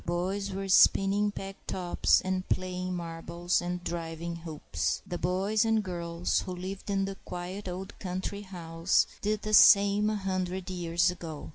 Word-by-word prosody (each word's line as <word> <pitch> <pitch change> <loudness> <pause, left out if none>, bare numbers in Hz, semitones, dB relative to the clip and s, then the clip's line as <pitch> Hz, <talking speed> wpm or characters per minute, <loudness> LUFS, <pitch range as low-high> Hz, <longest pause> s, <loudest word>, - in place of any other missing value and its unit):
Boys 190 +4 -2
were 195 +1 -4
spinning 195 +2 +5
peg 195 -1 -7
tops 180 -2 +2
and 185 0 -2
playing 185 0 -2
marbles 170 +1 -2
and 175 0 -4
driving 170 0 -4
hoops. 160 -2 -3
The 175 - -5
boys 195 +5 +1
and 225 -1 +2
girls 170 -2 -1
who 185 - -5
lived 190 +3 -6
in 195 -1 +1
the 195 0 -5
quiet 180 +3 -6
old 185 +1 -6
country 185 +2 -4
house 170 -3 0 0.2
did 210 0 -1
the 215 - -3
same 205 0 +7
a 215 - 0
hundred 190 -1 -3
years 175 0 +1
ago. 165 -4 -7
185 Hz, 155 wpm, -29 LUFS, 175-195 Hz, 0.2 s, same